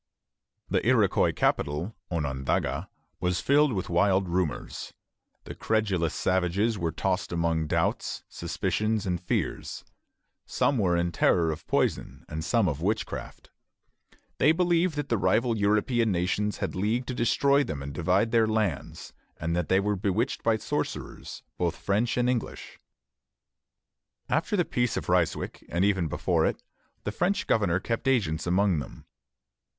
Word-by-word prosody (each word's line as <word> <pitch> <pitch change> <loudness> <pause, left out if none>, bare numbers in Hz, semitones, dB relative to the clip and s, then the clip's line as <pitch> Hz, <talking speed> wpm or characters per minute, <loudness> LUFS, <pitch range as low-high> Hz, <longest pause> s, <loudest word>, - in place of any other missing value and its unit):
The - - 0
Iroquois - - +3
capital, 75 +9 -1
Onondaga, 70 -6 -1 0.3
was 90 0 0
filled 145 +6 +3
with 95 -5 -2
wild 95 +2 +2
rumors. 85 -6 -3 0.5
The - - -8
credulous 100 -7 0
savages 95 +5 +1
were 85 -4 -2
tossed - - -1
among 85 -2 0
doubts, - - -1
suspicions, 95 +5 -1
and 90 -3 -1
fears. 90 - -3 0.6
Some 140 -4 +1
were 90 -4 +2
in 85 0 0
terror 85 -1 +3
of 80 +1 -7
poison, - - -1
and 80 +1 -5
some 115 +2 +2
of 75 -2 -2
witchcraft. 105 +5 -3 0.9
They 150 - +6
believed 175 0 +2
that 145 -2 -3
the 115 - +1
rival 115 +3 +2
European 110 +2 +2
nations 95 +3 0
had - - -3
leagued 110 +6 -1
to - - -1
destroy 140 +4 +3
them 70 - -5
and 70 0 -6
divide 90 +8 +1
their 115 -1 +4
lands, 110 -8 -2 0.2
and 85 +1 -2
that 90 -2 -1
they 95 - +4
were 105 +1 0
bewitched 105 +6 -1
by 115 -1 +2
sorcerers, - - -4 0.2
both 85 -1 0
French 110 +5 0
and 125 0 +2
English. 125 -3 -3 1.5
After 165 +8 +1
the 175 - +2
Peace 120 -1 0
of - - -4
Ryswick, - - 0
and 85 +4 +1
even 95 -5 +1
before - - 0
it, - - -3 0.4
the 105 - -2
French 180 - 0
governor 95 -5 +2
kept 115 +6 -3
agents 90 -12 +1
among 95 -1 +2
them. - - -9
100 Hz, 145 wpm, -27 LUFS, 85-115 Hz, 1.5 s, They